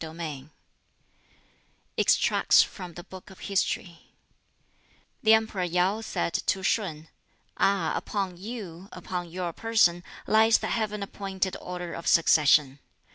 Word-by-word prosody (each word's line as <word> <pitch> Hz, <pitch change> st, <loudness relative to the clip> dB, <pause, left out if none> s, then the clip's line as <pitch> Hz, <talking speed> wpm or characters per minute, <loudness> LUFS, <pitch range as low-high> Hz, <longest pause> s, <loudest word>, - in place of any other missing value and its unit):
BOOK 160 Hz, 0 st, -7 dB
XX 150 Hz, -4 st, -6 dB, 1.5 s
Extracts -, -, +4 dB
from 175 Hz, -2 st, -9 dB
the 175 Hz, -, -8 dB
Book 185 Hz, +1 st, -12 dB
of 190 Hz, -, -15 dB
History 185 Hz, -3 st, -2 dB, 1.2 s
The 220 Hz, 0 st, +6 dB
Emperor 220 Hz, -3 st, -1 dB
Yau 180 Hz, +4 st, +1 dB
said 195 Hz, -5 st, -3 dB
to 190 Hz, -1 st, -1 dB
Shun, 165 Hz, -6 st, -1 dB, 0.5 s
"Ah, 195 Hz, -5 st, +2 dB
upon 195 Hz, -3 st, -3 dB
you, 195 Hz, -3 st, -8 dB
upon 180 Hz, -1 st, -5 dB
your 175 Hz, 0 st, -4 dB
person, 195 Hz, -6 st, +2 dB, 0.2 s
lies 220 Hz, +1 st, +5 dB
the -, -, -4 dB
Heaven 210 Hz, -2 st, -2 dB
appointed 190 Hz, -1 st, -3 dB
order 180 Hz, -1 st, -6 dB
of 170 Hz, -, -7 dB
succession! 150 Hz, -4 st, +4 dB
180 Hz, 125 wpm, -27 LUFS, 170-200 Hz, 1.5 s, The